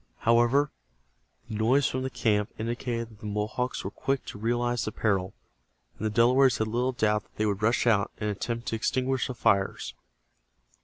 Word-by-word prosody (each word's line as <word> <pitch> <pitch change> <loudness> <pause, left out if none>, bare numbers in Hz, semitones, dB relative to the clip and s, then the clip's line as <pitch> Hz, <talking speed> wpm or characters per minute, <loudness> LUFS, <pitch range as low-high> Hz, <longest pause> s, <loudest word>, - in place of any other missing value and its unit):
However, 120 +5 +3 0.8
the - - -7
noise 125 +6 +3
from 130 - -2
the 130 - -2
camp 110 -3 +1
indicated 115 0 -3
that 110 -2 -17
the 105 - -7
Mohawks 105 +5 -2
were - - -4
quick 135 0 -2
to 100 - -8
realize 120 +1 0
the 110 - -3
peril, 95 -4 0 0.6
and - - -6
the 110 - +1
Delawares 125 +4 +4
had 110 - 0
little 125 +3 0
doubt 105 -3 +1
that - - -33
they 110 - 0
would 100 -2 -1
rush 115 +3 +2
out 105 -4 +3
and 105 - -3
attempt 115 +3 -3
to - - -1
extinguish 130 +3 0
the 125 - -5
fires. 100 - +1
115 Hz, 185 wpm, -28 LUFS, 105-125 Hz, 0.8 s, Delawares